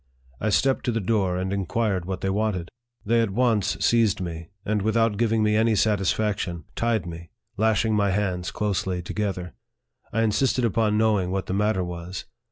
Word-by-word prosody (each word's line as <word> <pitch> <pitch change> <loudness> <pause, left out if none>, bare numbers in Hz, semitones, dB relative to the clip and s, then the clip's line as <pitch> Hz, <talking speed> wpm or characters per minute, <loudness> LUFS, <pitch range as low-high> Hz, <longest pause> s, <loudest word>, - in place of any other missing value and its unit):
I 110 - 0
stepped 135 +5 +2
to 120 - +1
the 115 - 0
door, 95 -3 +1
and 95 +1 -2
inquired 100 -1 -1
what 95 0 -4
they 95 - 0
wanted. 100 -4 -1 0.4
They 115 +2 +3
at 115 - +1
once 110 -1 +1
seized 115 -4 +3
me, 85 -2 -5 0.2
and, 105 0 0
without 110 +1 +2
giving 110 0 +1
me 105 0 +2
any 110 0 +3
satisfaction, 100 -4 0
tied 115 -5 0
me 85 -1 -8 0.3
lashing 110 +1 +2
my 100 -1 +2
hands 95 -2 -1
closely 95 -4 -2
together. 95 -2 -3 0.6
I 115 - +1
insisted 125 +3 +2
upon 110 -1 +1
knowing 105 -4 +2
what 95 0 -2
the - - -3
matter 105 -1 +1
was. 90 0 -6
105 Hz, 175 wpm, -25 LUFS, 95-110 Hz, 0.6 s, They